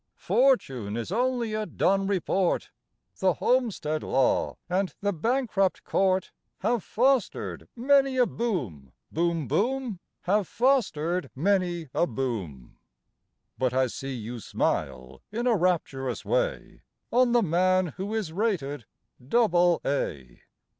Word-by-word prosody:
Fortune 135 Hz, -, +1 dB
is 115 Hz, +7 st, -4 dB
only 240 Hz, 0 st, 0 dB
a 215 Hz, 0 st, -2 dB
Dun 195 Hz, 0 st, +1 dB
report; 190 Hz, -1 st, 0 dB, 0.5 s
The -, -, +3 dB
Homestead 205 Hz, -12 st, 0 dB
Law 135 Hz, -1 st, +1 dB
and 185 Hz, +2 st, -1 dB
the 200 Hz, 0 st, 0 dB
Bankrupt 215 Hz, -, 0 dB
Court 190 Hz, -1 st, +1 dB, 0.3 s
Have 235 Hz, -5 st, +1 dB
fostered 255 Hz, +1 st, 0 dB
many 270 Hz, +1 st, +3 dB
a 250 Hz, -, +5 dB
boom, 125 Hz, -, -3 dB, 0.2 s
Boom, 165 Hz, -3 st, 0 dB
boom! 245 Hz, -3 st, -1 dB, 0.2 s
Have 200 Hz, 0 st, +1 dB
fostered 185 Hz, -, +1 dB
many 175 Hz, 0 st, 0 dB
a 175 Hz, -, +2 dB
boom. 105 Hz, -, -5 dB, 0.8 s
(But 130 Hz, -1 st, +1 dB
I 130 Hz, 0 st, +4 dB
see 135 Hz, +2 st, -5 dB
you 120 Hz, +1 st, -6 dB
smile 65 Hz, -, -2 dB
in 235 Hz, +3 st, -2 dB
a 240 Hz, -2 st, +4 dB
rapturous 160 Hz, -, -1 dB
way -, -, -1 dB, 0.3 s
On 250 Hz, 0 st, +4 dB
the 240 Hz, -1 st, +4 dB
man 185 Hz, -1 st, +2 dB
who 200 Hz, +4 st, -3 dB
is 195 Hz, -8 st, -3 dB
rated 160 Hz, -, -1 dB, 0.4 s
double 175 Hz, -, +3 dB
A.) 70 Hz, -, -3 dB
185 Hz, 120 wpm, -27 LUFS, -, 0.8 s, a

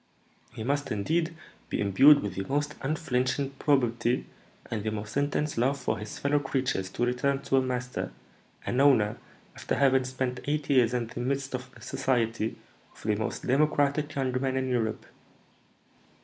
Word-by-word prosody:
"He 110 Hz, -, -6 dB
must, 140 Hz, +4 st, -1 dB
indeed, 160 Hz, -, 0 dB, 0.3 s
be -, -, -2 dB
imbued 120 Hz, +9 st, +6 dB
with 100 Hz, -3 st, -3 dB
the 95 Hz, +1 st, -3 dB
most 145 Hz, +2 st, -1 dB
unflinching 135 Hz, -2 st, 0 dB
probity 120 Hz, -4 st, +2 dB, 0.5 s
and 105 Hz, -3 st, -2 dB
the 110 Hz, -, 0 dB
most 105 Hz, 0 st, -5 dB
intense 145 Hz, -1 st, 0 dB
love 135 Hz, +4 st, +2 dB
for -, -, -2 dB
his 105 Hz, 0 st, -7 dB
fellow 145 Hz, +1 st, +2 dB
creatures 130 Hz, -8 st, -1 dB
to 120 Hz, -, -1 dB
return 135 Hz, +3 st, 0 dB
to 135 Hz, -, +2 dB
a -, -, +5 dB
master, 125 Hz, -1 st, -3 dB, 0.5 s
an 125 Hz, -, +1 dB
owner, 115 Hz, -7 st, +4 dB, 0.4 s
after -, -, -2 dB
having 130 Hz, -1 st, +3 dB
spent 130 Hz, -1 st, -2 dB
eight 145 Hz, 0 st, -1 dB
years 125 Hz, -3 st, +4 dB
in 120 Hz, -1 st, 0 dB
the 115 Hz, -, -8 dB
midst 135 Hz, +2 st, -2 dB
of 130 Hz, 0 st, -4 dB
the -, -, -15 dB
society 115 Hz, -3 st, -1 dB, 0.3 s
of -, -, -17 dB
the 105 Hz, -, +2 dB
most 110 Hz, +1 st, -3 dB
democratic 145 Hz, +2 st, +2 dB
young 135 Hz, -2 st, 0 dB
men 130 Hz, -1 st, 0 dB
in 130 Hz, 0 st, -1 dB
Europe." 115 Hz, -3 st, -1 dB
130 Hz, 165 wpm, -28 LUFS, 115-140 Hz, 0.5 s, imbued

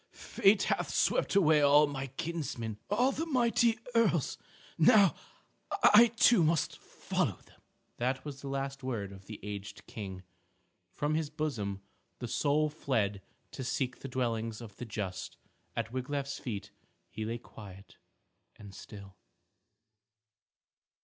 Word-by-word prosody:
"Fate 200 Hz, +1 st, +2 dB
hath -, -, 0 dB
swept -, -, +1 dB
away 155 Hz, -6 st, +5 dB
all 145 Hz, +1 st, +6 dB
my 135 Hz, -2 st, -4 dB
kinsmen, 130 Hz, -7 st, -4 dB
all 245 Hz, +6 st, +3 dB
the 325 Hz, +4 st, -3 dB
mighty 235 Hz, -4 st, +3 dB, 0.2 s
earls. 205 Hz, -, +2 dB, 0.4 s
Now 195 Hz, +4 st, +6 dB, 0.7 s
I 230 Hz, +3 st, +9 dB
too 230 Hz, -5 st, +6 dB
must 160 Hz, 0 st, +1 dB
follow -, -, -2 dB
them." -, -, -23 dB, 0.4 s
That 130 Hz, +3 st, -1 dB
was 140 Hz, -2 st, -7 dB
the 140 Hz, -, -7 dB
last 135 Hz, 0 st, -3 dB
word 115 Hz, -7 st, -3 dB
of 95 Hz, 0 st, -13 dB
the 110 Hz, -, -8 dB
aged 100 Hz, -1 st, -7 dB
King. 95 Hz, -4 st, -7 dB, 0.7 s
From 145 Hz, +1 st, -1 dB
his 155 Hz, -1 st, 0 dB
bosom 110 Hz, -11 st, -3 dB, 0.3 s
the 120 Hz, -, -5 dB
soul 150 Hz, +5 st, +2 dB
fled 110 Hz, -10 st, -1 dB, 0.3 s
to 130 Hz, -, -6 dB
seek 130 Hz, 0 st, -2 dB
the -, -, -7 dB
dwellings 115 Hz, -3 st, -2 dB
of 110 Hz, -4 st, -10 dB
the 125 Hz, -, -6 dB
just. 100 Hz, -4 st, -5 dB, 0.4 s
At 115 Hz, 0 st, -3 dB
Wiglaf's 140 Hz, +2 st, -3 dB
feet 105 Hz, -6 st, -5 dB, 0.4 s
he 110 Hz, -, -5 dB
lay 115 Hz, +2 st, -2 dB
quiet 100 Hz, -4 st, -13 dB, 0.6 s
and 100 Hz, -2 st, -12 dB
still. 100 Hz, -2 st, -11 dB
135 Hz, 135 wpm, -31 LUFS, 110-155 Hz, 0.7 s, I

